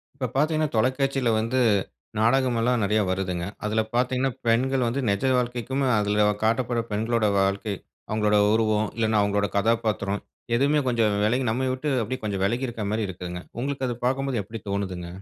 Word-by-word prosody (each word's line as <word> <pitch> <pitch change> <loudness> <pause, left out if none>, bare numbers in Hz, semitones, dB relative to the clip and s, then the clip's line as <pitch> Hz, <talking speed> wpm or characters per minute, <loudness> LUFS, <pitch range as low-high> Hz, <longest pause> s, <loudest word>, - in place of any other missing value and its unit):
இப்ப 130 -2 -2
பாத்தீங்கன்னா, 155 +1 +2
தொலைக்காட்சில 130 +2 +1
வந்து 115 +4 0 0.6
நாடகம் 125 +1 +3
எல்லாம் 120 0 +2
நறைய 105 +2 +2
வருதுங்க. 90 -2 -2 0.2
அதுல 110 +1 +1
பாத்தீங்கன்னா, 125 +2 +1 0.2
பெண்கள் 130 +3 +2
வந்து 130 +4 -1
நெஜ 100 +5 0
வாழ்க்கைக்கும், 125 +2 -1 0.2
அதுல 105 0 +2 0.2
காட்டப்படுற 115 +1 +1
பெண்களோட 110 +1 +1
வாழ்க்கை, 100 +1 0 0.3
அவங்களோட 105 -1 +2 0.2
உருவம், 110 -1 +2
இல்லனா 110 -2 +2
அவங்களோட 100 0 +1
கதாபாத்திரம், 105 -2 0 0.3
எதுவுமே 140 +4 +3
கொஞ்சம் 115 -4 +2
வெலகி 125 +5 +1
நம்ம 130 +3 -1
விட்டு 130 +4 -3
அப்படியே 130 +4 -4
கொஞ்சம் 100 -3 -1
வெலகி 120 +6 0
இருக் 115 -2 -5
மாரி 110 -1 -1
இருக்குங்க. 90 -1 -6 0.2
உங்களுக்கு 135 0 -2
அது 120 - -2
பாக்கும்போது 135 -1 0
எப்டி 110 +3 -8
தோணுதுங்க? 95 -3 -3
115 Hz, 155 wpm, -25 LUFS, 105-130 Hz, 0.6 s, நாடகம்